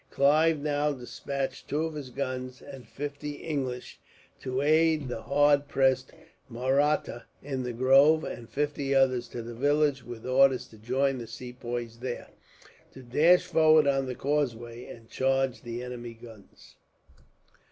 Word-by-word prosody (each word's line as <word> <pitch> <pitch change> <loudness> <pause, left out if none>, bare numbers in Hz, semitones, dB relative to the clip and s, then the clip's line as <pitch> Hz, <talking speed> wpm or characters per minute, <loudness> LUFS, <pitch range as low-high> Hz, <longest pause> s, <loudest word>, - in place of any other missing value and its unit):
Clive 155 +3 +3
now 145 0 0
despatched 135 +1 -5
two 150 +3 -1
of 160 - -4
his 145 -4 -7
guns, 130 -1 -4
and 135 -3 -11
fifty 145 +1 -5
English, 135 -5 -5 0.4
to 130 0 -3
aid 155 0 +3
the 120 -3 -5
hard 145 +1 +3
pressed 130 -2 +1 0.4
Mahrattas 130 +1 0 0.2
in 135 -2 -3
the 125 -1 -3
grove; 135 +6 +5
and 115 -1 -7
fifty 145 -1 -1
others 130 -2 +3
to 120 - -7
the 120 +1 -7
village, 145 +1 +1
with 120 -2 -9
orders 130 0 +3
to 110 - -16
join 130 +4 0
the 115 - -7
Sepoys 120 -1 -6
there, 125 0 -5 0.6
to 130 - -12
dash 165 +9 +4
forward 155 -3 +5
on 135 -1 +2
to 135 - -5
the 125 - -4
causeway, 120 -4 -2
and 115 -1 -12
charge 135 -1 0
the 120 +1 -6
enemy's 120 -2 -7
guns. 110 -4 -15
135 Hz, 150 wpm, -28 LUFS, 125-145 Hz, 0.6 s, grove